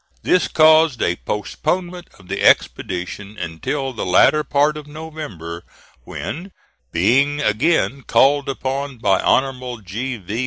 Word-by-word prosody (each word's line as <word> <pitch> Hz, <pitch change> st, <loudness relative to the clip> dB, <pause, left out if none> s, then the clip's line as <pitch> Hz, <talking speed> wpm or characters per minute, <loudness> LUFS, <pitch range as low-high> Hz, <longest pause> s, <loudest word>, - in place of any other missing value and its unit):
This 180 Hz, -, +2 dB
caused 155 Hz, -3 st, +5 dB
a 90 Hz, -, +1 dB
postponement 175 Hz, -, -3 dB
of 95 Hz, -3 st, -18 dB
the -, -, -4 dB
expedition 100 Hz, +4 st, 0 dB
until 130 Hz, -, -3 dB
the 110 Hz, -, -4 dB
later 135 Hz, +12 st, +4 dB
part 145 Hz, +1 st, +1 dB
of 150 Hz, -1 st, -8 dB
November, 150 Hz, -, -8 dB, 0.4 s
when, 185 Hz, +5 st, -6 dB, 0.4 s
being 135 Hz, -, +2 dB
again 140 Hz, +3 st, +1 dB
called 140 Hz, +2 st, +3 dB
upon 135 Hz, 0 st, -3 dB
by 95 Hz, -4 st, +2 dB
Hon. 125 Hz, -3 st, 0 dB
G. 120 Hz, +7 st, -4 dB
V. 105 Hz, +3 st, -5 dB
135 Hz, 125 wpm, -20 LUFS, 105-150 Hz, 0.4 s, caused